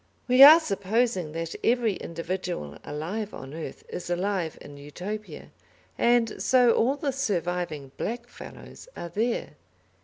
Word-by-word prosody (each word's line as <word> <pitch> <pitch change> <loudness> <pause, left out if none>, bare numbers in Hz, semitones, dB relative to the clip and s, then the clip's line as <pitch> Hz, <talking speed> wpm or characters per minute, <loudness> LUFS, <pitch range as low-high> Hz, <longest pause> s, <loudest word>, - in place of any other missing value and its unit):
We 250 +1 +5
are 305 +4 +12
supposing 200 - -1
that 165 0 -4
every 235 -3 +2
individual 170 - -5
alive 185 +9 -5
on 135 +1 -9
earth 160 0 -7
is 175 - -7
alive 180 -2 -1
in 145 - -12
Utopia, 180 +9 -7 0.4
and 235 -2 +2
so 250 -2 +5
all 250 +5 +2
the 290 -1 -2
surviving 175 - -2
"black 240 +2 -4
fellows" 245 - -12
are 170 - -6
there. 225 -6 -2
195 Hz, 130 wpm, -26 LUFS, 165-240 Hz, 0.4 s, are